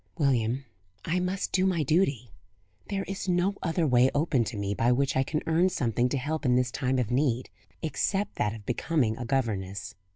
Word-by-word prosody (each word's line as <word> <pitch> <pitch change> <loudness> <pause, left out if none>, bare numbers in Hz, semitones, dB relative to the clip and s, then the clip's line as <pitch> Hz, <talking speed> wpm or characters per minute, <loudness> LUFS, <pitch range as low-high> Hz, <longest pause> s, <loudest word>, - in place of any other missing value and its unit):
"William, 130 -3 +1 0.4
I 180 +3 +1
must 185 +2 -2
do 185 - +2
my 170 -4 +1
duty. 140 - +1 0.6
There 195 -1 -1
is 195 -1 -5
no 180 +3 +2
other 165 -1 0
way 125 -2 +5
open 145 -4 +2
to 110 0 -5
me, 100 0 -1
by 115 +4 +2
which 135 +2 +1
I 130 - +3
can 150 +3 -2
earn 170 +3 +3
something 125 - 0
to 140 - -1
help 155 +4 -2
in 125 -3 +3
this 125 0 +1
time 130 -1 0
of 125 -3 -1
need, 125 -2 0 0.3
except 195 +5 -1
that 105 +1 0
of 105 -2 -11
becoming 125 -1 0
a 120 - -5
governess. 100 -7 -2
135 Hz, 195 wpm, -28 LUFS, 120-165 Hz, 0.6 s, way